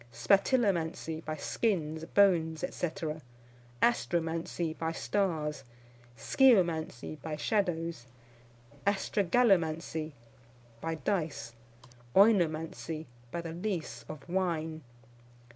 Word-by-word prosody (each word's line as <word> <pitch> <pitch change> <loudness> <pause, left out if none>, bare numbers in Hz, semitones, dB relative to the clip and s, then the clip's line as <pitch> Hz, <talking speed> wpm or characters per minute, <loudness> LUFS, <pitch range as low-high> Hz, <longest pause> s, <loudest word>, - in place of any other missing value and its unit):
Spatilomancy, 175 - +1
by 155 - -3
skins, 160 -2 -1
bones, 165 -5 +3
&c. 175 - -1 1.0
Astromancy, 165 -6 0
by 160 0 -2
stars. 160 -6 -1 0.5
Sciomancy, 170 - +2
by 155 0 -4
shadows. 165 - -1 0.8
Astragalomancy, 175 -6 +2 0.7
by 165 0 -2
dice. 155 - -2 0.6
Oinomancy, 165 -5 +3 0.2
by 170 - -3
the 165 -1 -6
lees 170 - -3
of 155 0 -8
wine. 165 -3 -1
165 Hz, 75 wpm, -31 LUFS, 155-195 Hz, 1.0 s, bones